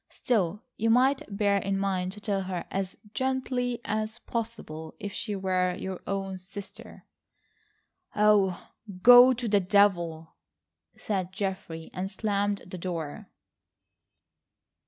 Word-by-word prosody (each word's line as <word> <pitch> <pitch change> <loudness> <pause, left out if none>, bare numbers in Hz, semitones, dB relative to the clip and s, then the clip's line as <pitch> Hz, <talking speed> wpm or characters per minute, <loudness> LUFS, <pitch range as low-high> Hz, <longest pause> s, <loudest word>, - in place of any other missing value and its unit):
Still, 210 -3 -1
you 225 +1 +1
might 260 +4 +4
bear 200 0 +2
in 195 0 -1
mind 190 -2 -1
to 210 - -11
tell 200 -2 -1
her 185 -2 -4
as 195 -1 -3 0.2
gently 255 -1 -1
as 215 +2 -2
possible. 220 -10 -5
If 205 0 -5
she 210 -2 -3
were 185 -2 0
your 190 -1 -5
own 195 -1 -3
sister—" 195 +2 -11 1.1
"Oh, 205 -3 +3 0.3
go 245 +1 +10
to 240 -1 -3
the 205 -1 +4
devil," 180 -5 +2 0.6
said 190 -4 -2
Geoffrey, 190 -4 -4
and 185 +1 -3
slammed 205 0 -1
the 185 0 -8
door. 165 -4 -5
200 Hz, 120 wpm, -28 LUFS, 185-215 Hz, 1.1 s, go